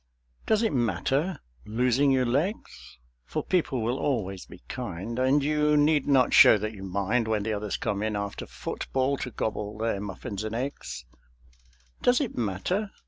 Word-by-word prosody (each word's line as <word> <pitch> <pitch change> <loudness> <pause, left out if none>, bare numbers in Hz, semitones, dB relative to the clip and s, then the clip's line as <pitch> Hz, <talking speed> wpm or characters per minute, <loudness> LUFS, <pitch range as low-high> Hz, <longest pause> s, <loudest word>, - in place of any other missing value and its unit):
Does 220 +1 +3
it 225 - +1
matter? 135 +7 0 0.3
losing 125 +5 +2
your 130 -1 +3
legs?... 145 - -2 0.3
For - - -3
people 145 -9 0
will 120 +4 -1
always 95 -9 -2
be 90 - -14
kind, 115 -1 -5
And 135 +3 +3
you 150 0 +2
need 150 -1 +3
not 135 -3 +4
show - - +9
that 110 +2 -4
you 100 - -10
mind 100 +5 0
When 110 -2 0
the 110 +1 -1
others 105 -2 -2
come 100 -1 -2
in 110 0 -1
after 100 0 -4
football 135 +1 -2
To 130 - -4
gobble 105 -2 -3
their 110 -2 -1
muffins 100 +1 -5
and 110 +1 -4
eggs. 115 - -5 1.0
Does 245 0 +4
it 280 -6 -2
matter? 120 - -1
120 Hz, 165 wpm, -27 LUFS, 105-140 Hz, 1.0 s, show